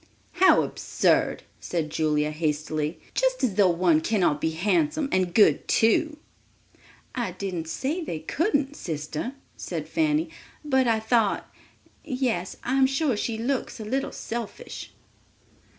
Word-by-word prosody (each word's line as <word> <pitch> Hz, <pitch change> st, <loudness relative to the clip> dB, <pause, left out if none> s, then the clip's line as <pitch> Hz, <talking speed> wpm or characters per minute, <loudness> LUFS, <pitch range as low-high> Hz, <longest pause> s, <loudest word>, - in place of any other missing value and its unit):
"How 375 Hz, +1 st, +5 dB
absurd," -, -, +1 dB, 0.2 s
said 160 Hz, -3 st, -3 dB
Julia 150 Hz, -1 st, +1 dB
hastily; 155 Hz, 0 st, -2 dB
"just -, -, +1 dB
as 240 Hz, -6 st, +2 dB
though 195 Hz, -1 st, +4 dB
one 170 Hz, -2 st, +3 dB
cannot 175 Hz, -7 st, +1 dB
be 160 Hz, -, +1 dB
handsome 295 Hz, -, +1 dB
and 185 Hz, -2 st, +1 dB
good 210 Hz, +3 st, +4 dB
too." 300 Hz, +8 st, +3 dB, 1.0 s
"I 235 Hz, -8 st, -2 dB
didn't 180 Hz, -3 st, -4 dB
say 305 Hz, -, -2 dB
they 170 Hz, -, -4 dB
couldn't, 290 Hz, -, 0 dB
sister," 155 Hz, -, -4 dB, 0.2 s
said -, -, -5 dB
Fanny; 315 Hz, 0 st, +1 dB, 0.3 s
"but 265 Hz, -3 st, +2 dB
I 225 Hz, -1 st, +3 dB
thought—yes, 225 Hz, -1 st, -2 dB
I'm 265 Hz, +1 st, +3 dB
sure 270 Hz, -1 st, +1 dB
she 220 Hz, +2 st, -2 dB
looks 250 Hz, +2 st, -2 dB
a 215 Hz, -, -6 dB
little 265 Hz, +5 st, -1 dB
selfish!" 230 Hz, -2 st, -6 dB
220 Hz, 125 wpm, -26 LUFS, 170-275 Hz, 1.0 s, How